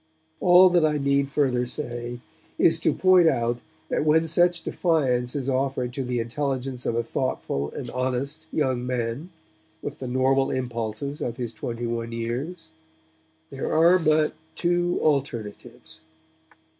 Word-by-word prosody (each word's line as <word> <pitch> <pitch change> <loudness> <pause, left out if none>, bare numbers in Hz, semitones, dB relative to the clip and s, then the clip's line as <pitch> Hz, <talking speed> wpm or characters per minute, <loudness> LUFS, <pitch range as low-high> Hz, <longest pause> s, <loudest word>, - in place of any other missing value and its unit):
All 180 +1 +7
that 175 -2 +4
I 150 -1 +2
need 140 0 +1
further 130 -4 +1
say 120 -2 -5 0.4
is - - +3
to - - +2
point 185 -2 +5
out 120 -3 0 0.3
that - - 0
when 155 +2 +3
such 175 +1 +2
defiance 130 -8 0
is 135 -2 -2
offered 130 -2 -1
to 135 - -3
the 125 -1 -2
intelligence 130 +1 -3
of 115 - 0
a 115 - +1
thoughtful 115 - -2
and 125 -4 -6
honest 130 +3 -3
young 130 -5 0
man 125 +6 -3 0.5
with - - -6
the 130 - -5
normal 130 +2 +2
impulses 120 +2 -3
of 120 -1 -3
his 120 -2 -4
twenty 115 +2 -4
one 115 0 -3
years, 140 +9 -4 0.8
there 135 - -4
are 170 +3 +5
but 155 -2 +2 0.2
two 175 0 +1
alternatives. 120 - -2
130 Hz, 145 wpm, -25 LUFS, 120-155 Hz, 0.8 s, All